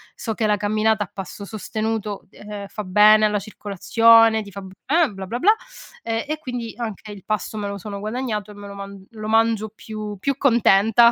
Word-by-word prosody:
so 225 - -4
che 220 0 -1
la 210 -1 +2
camminata 215 +1 +1
a - - -22
passo 195 +1 -7
sostenuto, 215 0 -4
uhm, 205 -1 -8
fa 210 +2 -6
bene 210 +3 +6
alla 210 -1 +1
circolazione, 220 +3 +4
ti 200 - -12
fa 200 - -8
bene, 250 - 0
bla 195 0 -7
bla 235 +5 -3
bla, 420 +10 +5 0.5
ehm, 225 0 -2
e 310 +1 -2
quindi 245 -5 -5
anche 220 -2 -6
il 195 -3 -12
pasto 215 +1 -2
me 205 -1 -3
lo 200 - -5
sono 200 +1 -7
guadagnato, 215 -1 -3
e - - -11
me 205 0 -10
lo 200 - -9
man 200 -1 -9
lo 215 -2 -7
mangio 225 -1 +2
più 215 -2 -7
più 275 +6 0
contenta 235 -3 +5
215 Hz, 200 wpm, -22 LUFS, 205-225 Hz, 0.5 s, bene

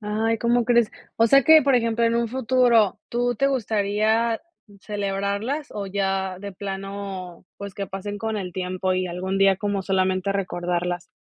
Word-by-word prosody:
Ay, 220 +2 0
¿cómo 240 +1 +2
crees?, 235 -2 +3 0.3
o 230 - +4
sea, 275 +4 +6
que, 315 +3 +7
por 275 -1 +3
ejemplo, 230 -1 +1
en 230 0 +2
un 235 0 0
futuro, 245 -4 +3
¿tú 245 +1 0
te 275 +5 +1
gustaría 220 -2 +1 0.4
celebrarlas 205 +8 -2
o 200 -1 -5
ya 190 -1 -2
de 200 +1 -7
plano, 195 -2 -6
pues, 200 -1 -7
que 200 -1 -4
pasen 205 +2 -6
con 220 0 -3
el 185 -3 -5
tiempo 185 0 -2
y 185 0 0
algún 185 +2 -3
día 195 -1 +4
como 200 0 -2
solamente, 190 0 0
recordarlas?, 175 -2 -2
200 Hz, 165 wpm, -23 LUFS, 190-230 Hz, 0.4 s, que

